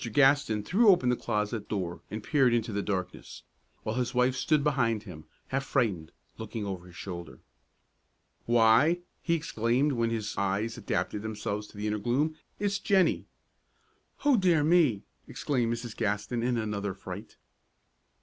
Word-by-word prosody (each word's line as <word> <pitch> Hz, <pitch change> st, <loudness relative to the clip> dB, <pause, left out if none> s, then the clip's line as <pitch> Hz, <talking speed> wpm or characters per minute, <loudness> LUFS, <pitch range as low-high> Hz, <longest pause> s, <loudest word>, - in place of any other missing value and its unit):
Gaston 135 Hz, -6 st, +4 dB
threw 215 Hz, -, +3 dB
open 175 Hz, -10 st, +5 dB
the 125 Hz, -, +3 dB
closet 105 Hz, -1 st, -2 dB
door 90 Hz, -5 st, -3 dB
and 110 Hz, +1 st, -5 dB
peered 130 Hz, -4 st, +3 dB
into 115 Hz, -2 st, -1 dB
the 100 Hz, -, 0 dB
darkness, 95 Hz, -3 st, -4 dB, 0.4 s
while 110 Hz, +3 st, -2 dB
his 125 Hz, -1 st, -1 dB
wife 125 Hz, +1 st, +3 dB
stood 150 Hz, +3 st, +2 dB
behind 115 Hz, -7 st, +1 dB
him, 80 Hz, -7 st, -10 dB, 0.2 s
half 135 Hz, +1 st, -1 dB
frightened, 105 Hz, -, 0 dB, 0.3 s
looking 110 Hz, -1 st, -5 dB
over 95 Hz, -2 st, -5 dB
his 90 Hz, -, -15 dB
shoulder. 85 Hz, -8 st, -7 dB, 1.1 s
"Why!" 120 Hz, +9 st, +5 dB, 0.2 s
he 170 Hz, -, +1 dB
exclaimed, 130 Hz, -2 st, +1 dB
when 115 Hz, -3 st, 0 dB
his 110 Hz, -2 st, -3 dB
eyes 100 Hz, +3 st, 0 dB
had -, -, -11 dB
adapted 100 Hz, +1 st, -1 dB
themselves 105 Hz, -1 st, -4 dB
to 105 Hz, -, -16 dB
the 105 Hz, -, -4 dB
inner 105 Hz, 0 st, -1 dB
gloom, 140 Hz, +8 st, 0 dB, 0.2 s
"it's 200 Hz, -1 st, -1 dB
Jennie!" 195 Hz, -2 st, +2 dB, 1.0 s
"Oh, 285 Hz, -4 st, +5 dB
dear 175 Hz, -6 st, +3 dB
me!" 155 Hz, -, +3 dB, 0.2 s
exclaimed 125 Hz, -5 st, -1 dB
Mrs. 120 Hz, -1 st, -4 dB
Gaston, 105 Hz, +4 st, -1 dB
in 120 Hz, 0 st, +1 dB
another 105 Hz, -3 st, -2 dB
fright. 95 Hz, +1 st, -9 dB
115 Hz, 155 wpm, -29 LUFS, 105-135 Hz, 1.1 s, open